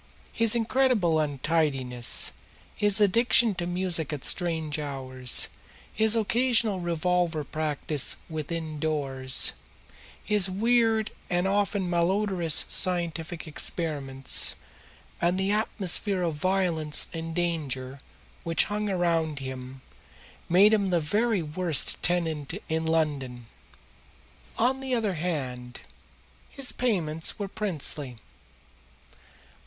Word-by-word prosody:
His 230 0 +1
incredible 230 -8 +2
untidiness, 140 -4 +1 0.4
his 205 0 +3
addiction 230 +2 +4
to 175 -2 -3
music 175 -4 0
at 145 -3 -3
strange 160 -3 0
hours, 130 -3 0 0.5
his 220 0 +3
occasional 230 -2 +2
revolver 175 -1 0
practice 150 -1 0
within 155 0 -5
doors, 135 -4 0 0.7
his 210 -3 +2
weird 225 +1 +2 0.2
and 180 +1 +1
often 200 -1 0
malodorous 175 -1 +1
scientific 170 -2 0
experiments, 145 -4 0 0.7
and 175 +2 +2
the 190 +1 0
atmosphere 200 -2 0
of 165 -2 -1
violence 165 -2 +1
and 165 0 -5
danger 140 -7 -2 0.4
which 165 -1 +3
hung 210 0 -2
around 165 -5 0
him 130 -1 -7 0.7
made 195 +5 +6
him 200 -3 +2
the 175 -2 +2
very 205 +5 0
worst 160 -1 -1
tenant 165 -4 -1
in 160 0 -2
London. 140 -7 -1 1.1
On 255 +3 +1
the 265 -1 -2
other 215 -5 0
hand, 130 -8 -4 0.7
his 275 -2 -3
payments 165 -10 -1
were 200 - -4
princely. 155 - -1
170 Hz, 100 wpm, -27 LUFS, 150-200 Hz, 1.1 s, made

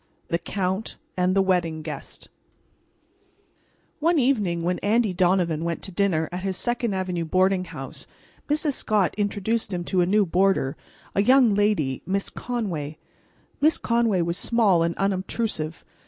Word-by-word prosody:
THE 170 - 0
COUNT 190 +3 -3 0.2
AND 185 +1 +1
THE 195 - +4
WEDDING 170 -4 0
GUEST 150 -3 -7 1.7
One 330 +2 +2
evening 210 - +1
when 175 0 0
Andy 215 -1 +2
Donovan 175 -3 +1
went 170 -1 -3
to 195 - -5
dinner 175 -4 +1
at 180 +1 -4
his 190 -1 -2
Second 240 -2 0
Avenue 180 -2 -2
boarding 185 +2 +2
house, 135 -6 -8 0.4
Mrs. 295 0 +1
Scott 210 -7 +1
introduced 205 +2 -1
him 175 -2 -2
to 180 +1 +1
a 175 - +2
new 205 +2 +3
boarder, 180 -5 +1 0.4
a 200 - +2
young 250 0 +5
lady, 200 -11 +1
Miss 195 +1 -1
Conway. 175 -12 -4 0.6
Miss 310 +2 +4
Conway 230 -6 +1
was 170 +1 -2
small 215 -7 +3
and 170 0 0
unobtrusive. 190 -4 -2
190 Hz, 145 wpm, -24 LUFS, 170-215 Hz, 1.7 s, young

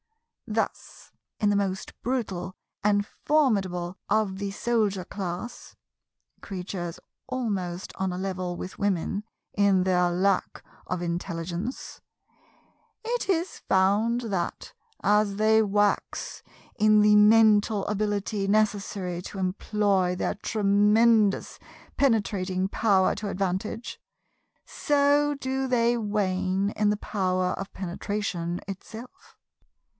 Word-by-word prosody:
Thus, - - -4 0.3
in 210 - +2
the - - +2
most 195 -1 -2
brutal 200 -8 -3 0.3
and 205 0 +2
formidable 195 - 0
off 210 -2 +2
the 200 +1 -4
soldier 205 -4 0
class—creatures 180 -2 -8 0.3
almost 195 -8 -3
on 190 -1 -1
a 180 - -4
level 185 -2 -3
with 185 - -7
women 200 +1 -1 0.3
in 200 -2 +3
their 180 -1 +2
lack 185 +2 0 0.2
of 180 -1 -2
intelligence—it 170 +5 -4 1.3
is 355 0 0
found 205 +6 +2
that, 195 -7 -3 0.3
as 205 0 +3
they 220 +1 +4
wax 205 -1 0 0.3
in 215 0 +5
the 210 0 +6
mental 210 -1 +5
ability 205 -1 -1
necessary 200 -4 0
to 195 - -8
employ 190 0 +1
their - - -1
tremendous 210 +1 +3 0.4
penetrating 195 -7 +1
power 195 -2 +2
to 210 - -4
advantage, 195 +5 -3 0.6
so 290 0 +2
do 265 -1 -2
they 240 -1 +2
wane 200 -3 0
in 210 -1 +1
the 210 - +1
power 185 -3 -1
of 195 +1 -6
penetration 180 -2 -3
itself. 220 +5 -10
200 Hz, 100 wpm, -26 LUFS, 185-215 Hz, 1.3 s, the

